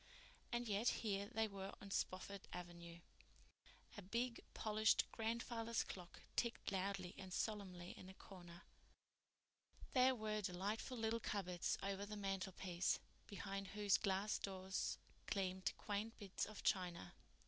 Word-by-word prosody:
And 240 0 +1
yet 210 +3 +4 0.2
here 200 -1 +2
they 225 -1 +2
were 195 -1 -5
on 200 - -8
Spofford 195 +1 -1
Avenue! 170 -1 -6 0.9
A 205 - -5
big, 230 +5 0
polished 215 0 +5
grandfather's 230 0 +1
clock 180 -2 -7
ticked 235 -4 +1
loudly 190 -1 0
and 190 -1 -6
solemnly 185 -4 -1
in 185 - -9
a 190 - -9
corner. 175 -3 -10 1.3
There 260 0 +7
were 215 -2 0
delightful 205 +6 -1
little 225 0 +2
cupboards 180 -5 0
over 195 0 0
the 210 0 -4
mantelpiece, 190 -2 +1 0.3
behind 195 0 -3
whose 205 -1 +4
glass 200 +1 +2
doors 190 -1 -1 0.3
gleamed 190 -2 +1
quaint 210 +2 -1
bits 200 -3 -1
of 215 0 -7
china. 175 -2 +2
200 Hz, 125 wpm, -44 LUFS, 185-215 Hz, 1.3 s, There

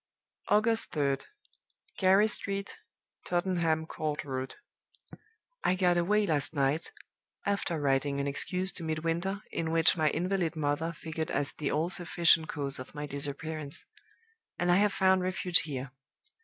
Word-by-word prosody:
"August 225 +2 +2
3d. 140 -3 0 0.7
Gary 195 +2 +5
Street, 200 -2 -3 0.4
Tottenham 175 -3 0
Court 155 -2 -3
Road. 130 -1 -4 1.1
I 180 - +3
got 180 -1 +3
away 205 +5 +2
last 155 -3 +3
night 140 +3 0 0.5
(after 200 -5 -1
writing 140 0 +1
an 140 - -1
excuse 180 +7 0
to 170 - -6
Midwinter, 165 +5 -2
in 160 - -2
which 165 0 +4
'my 155 -3 +2
invalid 175 +1 -1
mother' 155 +2 -1
figured 160 0 -5
as 145 0 -1
the 150 - -3
all 160 +3 0
sufficient 170 -3 +3
cause 140 -3 -2
of 130 - -9
my 150 0 -4
disappearance); 145 +1 -3 0.7
and 175 0 +1
I 175 - +5
have 205 +1 +3
found 190 -1 +3
refuge 180 -1 +2
here. 135 -4 -5
165 Hz, 140 wpm, -30 LUFS, 145-185 Hz, 1.1 s, Gary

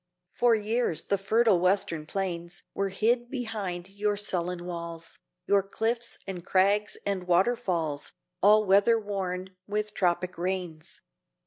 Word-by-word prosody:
For 240 -1 +3
years 220 -4 0
the 200 - 0
fertile 215 0 +3
Western 175 -4 +1
plains 175 -2 -4
Were 195 0 -1
hid 235 +5 +1
behind 210 -9 -4
your 205 +1 -1
sullen 180 -3 -2
walls, 170 -1 -6 0.3
Your 200 -1 +4
cliffs 230 +4 -2
and 185 -3 -6
crags 200 +3 +2
and 195 -3 -1
waterfalls 175 -6 +1 0.3
All 210 +1 +6
weatherworn 195 -2 +2 0.2
with 210 +1 -2
tropic 180 -1 0
rains. 175 -3 -4
195 Hz, 120 wpm, -28 LUFS, 175-210 Hz, 0.3 s, All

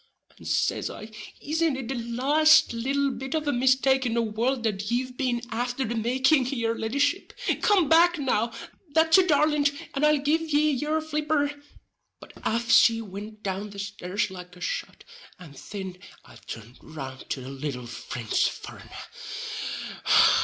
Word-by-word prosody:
And - - -10
says - - 0
I: 215 +1 -9 0.3
"Isn't 315 0 0
it 265 -3 -5
the - - -1
laste 270 +6 +4
little 275 +4 0
bit 265 +3 -5
of 310 -1 -2
a 290 - +2
mistake 260 +1 +3
in 235 -2 -1
the 235 - +2
world 230 +4 -1
that 205 -2 -2
ye've 250 +1 -1
been 245 -3 -1
afther 245 +3 -1
the 230 - -3
making, 260 +4 +2
yer 230 -4 -1
leddyship? 230 +5 -1 0.3
Come 390 -7 +4
back 340 +3 +5
now, 240 -5 0 0.4
that's 320 +2 +6
a 370 - +3
darlint, 295 -2 +3 0.2
and 275 - -2
I'll 300 0 +5
give 295 +3 +1
ye 305 -1 +2
yur 300 +4 0
flipper." 300 -1 0 0.7
But - - -14
aff 235 +1 0
she 225 -1 +6
wint 210 +1 -8
down 195 +2 -3
the 200 - -11
stairs 200 0 -3
like 180 -1 -10
a 180 - -15
shot, - - -4 0.3
and 160 -6 -13
thin 190 +4 -7 0.3
I - - -15
turned 115 +3 -9
round 135 -4 -9
to 135 - -3
the 130 - -8
little 135 -3 -5
Frinch 120 -1 -1
furrenner. - - -10
245 Hz, 160 wpm, -26 LUFS, 210-295 Hz, 0.7 s, that's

